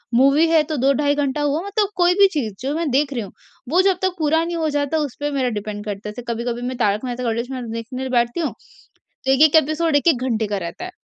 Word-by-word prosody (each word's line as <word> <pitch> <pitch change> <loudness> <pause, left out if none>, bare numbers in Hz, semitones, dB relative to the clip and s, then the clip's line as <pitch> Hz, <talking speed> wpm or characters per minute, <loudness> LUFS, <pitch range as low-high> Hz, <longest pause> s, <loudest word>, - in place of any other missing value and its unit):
Movie 275 +6 +5
है 325 -2 +5
तो 305 - -1
2 270 +3 +3
ढाई 285 +1 +1
घंटा 290 0 -1
हुआ, 295 +3 0
मतलब 410 0 0
कोई 355 0 +4
भी 395 - +8
चीज़, 230 -9 -2
जो 275 +3 -2
मैं 330 -3 -1
देख 280 +1 +1
रही 235 - -2
हूँ, 200 - -8 0.4
वो 355 +4 +4
जब 380 -1 +2
तक 375 0 +1
पे 300 -2 +1 0.2
नहीं 345 - -3
हो 315 -1 0
जाता 290 +2 0
उस 290 -5 -2
पर 290 0 -2
मेरा 260 -3 0
डिपेंड 205 0 -6
करता 210 0 -5
है। - - -5
जैसे 230 +4 -8
कभी-कभी 235 +1 -3
मैं 255 - -3
'तारक 210 0 0
मेहता 250 0 -4
का 235 - 0
उल्टा 230 +1 -1
चश्मा' 255 0 -6
देखने 255 +3 -5
बैठती 240 +2 +1
हूँ, 325 - -1 0.7
तो 265 - +3
1-1 295 +3 +5
एपिसोड 310 +1 0
1-1 285 -3 +3
घंटे 220 -2 0
का 205 -1 -2
रहता 360 - -7
है, 365 - -7
275 Hz, 260 wpm, -21 LUFS, 240-310 Hz, 0.7 s, भी